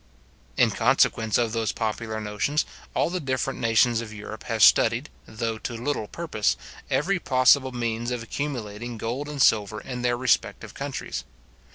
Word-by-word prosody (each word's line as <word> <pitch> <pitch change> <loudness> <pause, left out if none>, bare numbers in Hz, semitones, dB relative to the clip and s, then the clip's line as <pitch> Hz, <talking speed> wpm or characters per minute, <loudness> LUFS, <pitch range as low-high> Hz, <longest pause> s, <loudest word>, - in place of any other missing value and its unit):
In - - +4
consequence 110 -2 +2
of 115 -2 +1
those 115 -1 0
popular 110 0 -3
notions, 105 +8 0 0.3
all - - +1
the 185 - -1
different 130 -4 -2
nations 115 +1 +3
of 110 -2 -8
Europe 105 0 -8
have 110 -3 +1
studied, 120 +6 +5 0.2
though 110 0 -3
to 120 - -5
little 120 -3 -2
purpose, 155 -10 -1 0.3
every 175 +8 +1
possible 130 -1 +4
means 120 -1 -2
of 125 -2 -3
accumulating 120 -3 -4
gold 125 +7 -3
and 145 -1 -6
silver 105 -4 +3
in 125 0 -6
their 120 0 +1
respective 130 +1 0
countries. - - -5
120 Hz, 155 wpm, -25 LUFS, 110-130 Hz, 0.3 s, studied